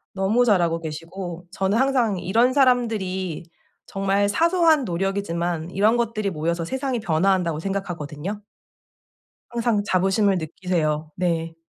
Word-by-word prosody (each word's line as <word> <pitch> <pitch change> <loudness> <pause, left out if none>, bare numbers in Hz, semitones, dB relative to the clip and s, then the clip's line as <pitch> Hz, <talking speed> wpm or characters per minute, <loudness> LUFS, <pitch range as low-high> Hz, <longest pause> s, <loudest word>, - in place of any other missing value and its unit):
너무 205 +6 +2
잘하고 175 -7 +2
계시고 165 +3 -7
저는 195 +2 0
항상 250 -6 +2
이런 230 +8 +2
사람들이 220 - +1 0.4
정말 195 +1 0
사소한 330 - +3
노력이지만 175 -3 -2
이런 215 +4 +3
것들이 215 -3 -1
모여서 170 0 -2
세상이 260 +3 -2
변화한다고 175 -2 +1
생각하거든요. 185 0 -4 1.1
항상 235 -3 0
자부심을 195 0 +2
느끼세요. 160 -2 -2
네. 165 -2 -1
195 Hz, 315 characters per minute, -23 LUFS, 170-220 Hz, 1.1 s, 사소한